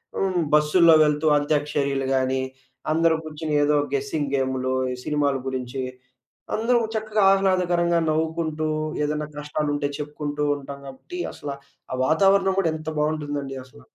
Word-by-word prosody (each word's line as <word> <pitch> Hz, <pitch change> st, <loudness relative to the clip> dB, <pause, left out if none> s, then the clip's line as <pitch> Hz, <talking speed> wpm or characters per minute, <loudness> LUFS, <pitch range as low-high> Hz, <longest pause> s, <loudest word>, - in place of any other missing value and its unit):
హ్మ్. 185 Hz, -2 st, 0 dB
బస్సుల్లో 160 Hz, +2 st, +6 dB
వెళ్తూ 150 Hz, +1 st, +1 dB
అంత్యాక్షరియలు 145 Hz, -2 st, 0 dB
గానీ, 130 Hz, 0 st, +1 dB, 0.5 s
అందరూ 165 Hz, +1 st, +3 dB
గూర్చొని 155 Hz, 0 st, -4 dB
ఏదో 150 Hz, +1 st, +3 dB, 0.2 s
గెసింగ్ 140 Hz, +1 st, -1 dB
గేమ్‌లు 130 Hz, -1 st, -1 dB, 0.2 s
ఈ -, -, -4 dB
సినిమాలు 145 Hz, -2 st, +1 dB
గురించి 130 Hz, 0 st, -3 dB, 0.7 s
అందరం 235 Hz, +1 st, +2 dB
చక్కగా 215 Hz, -1 st, 0 dB
ఆహ్లాదకరంగా 180 Hz, -3 st, +2 dB
నవ్వుకుంటూ 160 Hz, 0 st, -1 dB, 0.4 s
ఏదైనా 150 Hz, 0 st, -2 dB
కష్టాలుంటే 150 Hz, -1 st, -1 dB
చెప్పుకుంటూ 150 Hz, 0 st, -4 dB
ఉంటాం 140 Hz, 0 st, -8 dB
కాబట్టి 135 Hz, -, -9 dB
అసల 145 Hz, -, -6 dB, 0.4 s
ఆ -, -, 0 dB
వాతావరణం 195 Hz, +4 st, +3 dB
గూడా 170 Hz, -4 st, +2 dB
ఎంత 155 Hz, 0 st, -5 dB
బావుంటుందండి 145 Hz, -3 st, -2 dB
అసల. 140 Hz, +3 st, -17 dB
150 Hz, 125 wpm, -24 LUFS, 140-165 Hz, 0.7 s, బస్సుల్లో